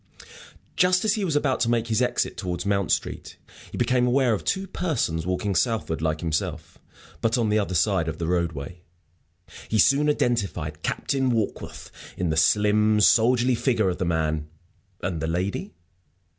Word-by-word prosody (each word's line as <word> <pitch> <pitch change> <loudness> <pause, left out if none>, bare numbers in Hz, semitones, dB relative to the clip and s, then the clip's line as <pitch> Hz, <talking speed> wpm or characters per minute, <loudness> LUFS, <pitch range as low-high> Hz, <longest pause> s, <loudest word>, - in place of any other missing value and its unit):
Just 180 +2 +3
as 215 - +3
he 210 - -2
was 165 -6 -1
about 140 -3 +1
to 115 - +1
make 115 -1 +1
his 115 +1 0
exit 125 - 0
towards 90 -4 -4
Mount 100 -4 0
Street - - -3 0.3
he - - -7
became 125 0 +2
aware 125 -1 +3
of 105 - -3
two 195 0 -1
persons 120 - -2
walking 95 +2 -1
southward 95 -4 0
like 80 -1 -1
himself, 80 0 -3 0.4
but 115 +2 +1
on 115 -3 +1
the 105 +1 +2
other 100 -3 -2
side 95 -2 +2
of 80 0 -4
the 85 - -3
roadway. 85 -1 -2 0.9
He 110 - +1
soon 140 +6 +4
identified 100 - -1
Captain 135 -2 -1
Warkworth 115 -4 -3 0.3
in 90 -3 -1
the - - 0
slim, 105 +6 +3
soldierly 120 +4 +4
figure 120 -4 +1
of 90 - -4
the 95 - 0
man. 80 -2 -1 0.6
And 90 -3 -2
the 80 - -1
lady? 95 - -3
105 Hz, 170 wpm, -24 LUFS, 85-125 Hz, 0.9 s, soon